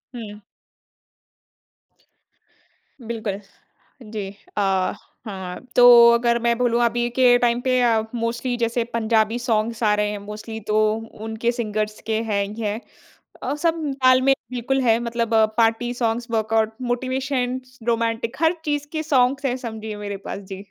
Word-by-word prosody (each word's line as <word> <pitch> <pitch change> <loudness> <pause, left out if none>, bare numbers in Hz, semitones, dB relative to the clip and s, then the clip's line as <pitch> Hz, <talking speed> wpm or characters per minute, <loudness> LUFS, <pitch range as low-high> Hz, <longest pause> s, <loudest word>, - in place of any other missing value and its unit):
हुँ। 210 -3 -8 2.7
बिल्कुल, 220 -4 -3 0.7
जी। 205 -3 -4 0.3
अ, - - +2 0.6
हाँ, 190 -4 -6 0.2
तो 240 -1 +9
अगर 235 0 +2
मैं 235 0 +2
बोलूँ 240 -1 +2
अभी 240 +1 +1
के 250 -2 +6
टाइम 240 0 +1
पे 255 0 +1
अ, 230 -2 +3
मोस्टली 235 +2 -2
जैसे 235 0 0
पंजाबी 225 0 +1
सॉन्ग्स 230 -1 -1
आ 210 -1 +4
रहे 210 0 0
हैं 210 - -4
मोस्टली 215 +2 -7
तो 215 - 0 0.5
उनके 225 +1 -1
सिंगर्स 215 -3 -3
के 220 0 0
हैं 210 -3 0
ही 210 +3 -7
हैं। 210 0 -2 0.6
अ, 270 +3 -1
सब 330 +2 0 0.2
तालमेल 255 +1 +5 0.2
बिल्कुल 255 +2 -1
है 230 -2 +3
मतलब 235 -1 -2 0.2
party 230 +1 +2
songs, 235 -1 -1
workout, 220 0 +1
motivations, 255 0 -2
romantic, 230 +1 -1
हर 325 +2 +3
चीज़ 290 -1 -1
के 315 -1 -2
सॉन्ग्स 275 -1 +2
हैं 250 -2 +1
समझिए 220 -3 -6
मेरे 205 -1 -5
पास। - - -4
जी। 190 +1 -8
235 Hz, 140 wpm, -22 LUFS, 220-250 Hz, 2.7 s, तो